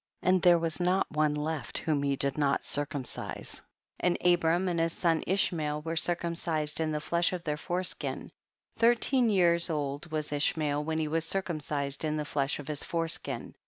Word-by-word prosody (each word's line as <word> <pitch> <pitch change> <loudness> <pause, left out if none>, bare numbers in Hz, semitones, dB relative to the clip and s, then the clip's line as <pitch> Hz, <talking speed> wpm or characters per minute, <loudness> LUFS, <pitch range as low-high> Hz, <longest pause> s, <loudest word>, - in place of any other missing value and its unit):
2. - - +2
And 185 -1 +4
there 175 -2 +6
was 165 0 -2
not 180 +2 +2
one 150 -1 +1
left 150 -4 -3
whom 150 -3 0
he 140 -1 +1
did 140 0 0
not 140 -2 +1
circumcise, 145 -2 -2 0.4
and 180 -1 +2
Abraham 175 +1 +3
and 175 -2 0
his 165 0 +1
son 165 -2 +1
Ishmael 155 -5 0
were 165 +1 -3
circumcised 165 -3 -1
in 160 -1 0
the 150 - -1
flesh 170 +4 +1
of 180 -2 -4
their 150 -3 -1
fore 175 +5 -2
skin; 185 - -5 0.5
thirteen 240 +1 +4
years 170 -4 +4
old 145 0 -3
was 155 -1 -2
Ishmael 145 0 0
when 160 +1 -2
he 160 -1 0
was 160 +1 0
circumcised 150 -6 -2
in 155 0 0
the 150 - -2
flesh 140 -1 0
of 145 - -9
his 150 -2 -2
foreskin. 165 -6 -3
160 Hz, 185 wpm, -30 LUFS, 150-175 Hz, 0.5 s, there